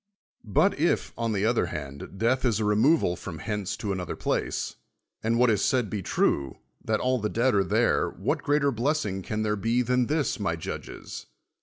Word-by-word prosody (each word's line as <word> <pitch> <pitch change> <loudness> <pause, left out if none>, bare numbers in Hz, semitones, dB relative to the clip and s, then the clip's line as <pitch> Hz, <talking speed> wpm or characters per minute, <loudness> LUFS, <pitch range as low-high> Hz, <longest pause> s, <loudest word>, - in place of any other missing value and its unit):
But 155 - +3
if, 170 +3 +1
on 115 -1 -1
the 100 -1 0
other 115 -5 +2
hand, 70 +3 -7
death 120 +5 +1
is 115 -5 +2
a 110 - 0
removal 105 - +3
from 85 -2 -7
hence 105 +2 -3
to 105 - -3
another 90 -3 -3
place, - - -2 0.4
and 115 +1 +1
what 125 -1 +5
is 105 -2 +1
said 125 -7 +1
be 105 - -2
true, 70 -6 0 0.3
that 110 -1 0
all 130 0 +1
the 105 -1 -1
dead 125 +3 +2
are 100 -1 +3
there, 90 - +2
what - - -2
greater 145 -1 +2
blessing 120 -5 -1
can 105 +3 -2
there 105 0 +1
be 115 +4 +1
than 125 0 +1
this, 150 -4 0
m.y 90 -5 -1
judges? 80 - -7
110 Hz, 190 wpm, -27 LUFS, 100-125 Hz, 0.4 s, what